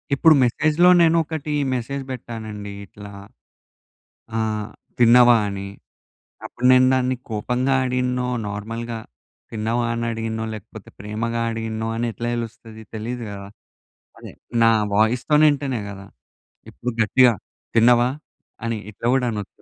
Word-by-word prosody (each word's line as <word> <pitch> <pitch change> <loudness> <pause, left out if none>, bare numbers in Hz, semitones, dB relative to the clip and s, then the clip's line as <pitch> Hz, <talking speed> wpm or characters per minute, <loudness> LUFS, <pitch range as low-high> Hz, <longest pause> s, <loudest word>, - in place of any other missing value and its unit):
ఇప్పుడు 160 +3 +6
మెసేజ్‌లో 155 +8 +3
నేనొకటి 160 -2 +1 0.2
మెసేజ్ 135 +3 -3
పెట్టానండి 110 -4 -7
ఇట్లా. 100 +1 -12 1.3
ఆ! - - +1 0.6
తిన్నావా 120 0 +7
అని. 100 -1 -5 0.8
అప్పుడు 125 - -5
నేను 130 0 +6
దాన్ని 130 0 +1
కోపంగా 125 +5 -1
అడిగిననో, 125 0 -1 0.2
నార్మల్‌గా 115 +3 -5 0.5
తిన్నావా 115 +2 -1
అని 115 0 -2
అడిగిననో 110 0 -3
లేకపోతే 105 -3 -11
ప్రేమగా 115 +3 -3
అడిగినో 110 0 -4
అని 115 +1 -1
ఎట్లా 120 - -4
తెలుస్తది? 115 -1 -7
తెలీదు 120 +3 -5
గదా! 100 -1 -8 0.7
అదే - - -10 0.3
నా 115 - +6 0.2
వాయిస్‌తోని 125 +8 +3
వింటేనే 140 -5 -1
గదా! 100 -1 -10 0.7
ఇప్పుడు 125 - -4
గట్టిగా 125 +2 +5 0.4
తిన్నావా 120 +1 +5 0.6
అని 115 -1 -1
ఇట్లా 105 - -9
గూడా 130 -2 +1
అనొచ్చు. 105 -3 -7
115 Hz, 115 wpm, -22 LUFS, 110-125 Hz, 1.3 s, తిన్నావా